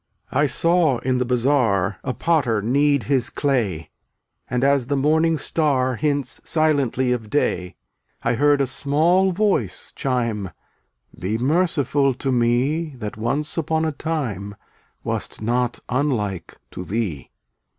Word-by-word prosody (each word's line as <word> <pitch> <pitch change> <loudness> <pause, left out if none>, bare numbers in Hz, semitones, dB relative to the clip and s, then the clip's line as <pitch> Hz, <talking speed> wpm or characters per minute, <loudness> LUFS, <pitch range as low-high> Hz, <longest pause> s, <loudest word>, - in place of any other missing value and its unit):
eun§ - - 0
I 145 - +4
saw 165 -3 +2
in 125 +2 -1
the 125 - 0
bazaar 120 -6 +1
A - - -1
potter 130 -7 +1
knead 140 +5 +2
his 130 -4 0
clay, 120 - 0
C/ 80 - -19 0.6
And 125 +1 -1
as 140 -3 +2
the 145 - 0
Morning 160 +3 +2
Star 135 -4 +1
Hints 145 -1 -1
silently 140 -5 +1
of 115 -3 -2
Day, 90 -10 -1 0.5
I 115 - +1
heard 145 +3 +3
a - - +3
small 160 +8 +2
voice 205 +2 -1
chime: 115 - -1 0.7
"Be 95 +5 -1
merciful 145 -1 +1
to 135 +1 -2
me 130 +6 +1
That 105 -4 -6
once 140 +9 -2
upon 160 0 0
a 160 - 0
time 125 - -4 0.5
Wast - - -4
not 120 +2 0
unlike 115 - -2
to 90 - -6
thee." 95 - -3
130 Hz, 140 wpm, -22 LUFS, 115-150 Hz, 0.7 s, I